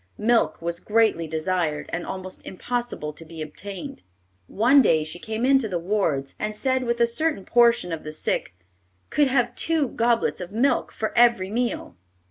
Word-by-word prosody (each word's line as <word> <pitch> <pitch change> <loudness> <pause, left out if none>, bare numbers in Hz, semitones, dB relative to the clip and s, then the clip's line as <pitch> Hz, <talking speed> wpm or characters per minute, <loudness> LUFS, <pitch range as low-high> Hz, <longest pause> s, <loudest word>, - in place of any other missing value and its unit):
Milk 230 +2 +2
was 170 0 -3
greatly 215 -7 +2
desired, 160 -1 -1
and 170 +1 -3
almost 185 0 -6
impossible 235 -7 -4
to 165 - -10
be 165 0 -11
obtained. 185 - -8 0.5
One 250 +7 +5
day 160 -10 +3
she 155 +3 -6
came 220 +4 -3
into 265 -3 +4
the 185 -4 -2
wards, 170 -7 -1
and 215 0 -3
said 260 +1 0
that 235 0 0
a 235 - +5
certain 235 -3 -1
portion 235 -7 +3
of 165 -1 -4
the 155 - -6
sick 155 - -2 0.6
"could 295 -1 +3
have 250 -2 +1
two 320 -5 +1
goblets 230 -4 +1
of 180 +1 -7
milk 240 +7 +1
for 220 - -4
every 235 -6 +4
meal." 240 - -2
215 Hz, 170 wpm, -24 LUFS, 170-240 Hz, 0.6 s, One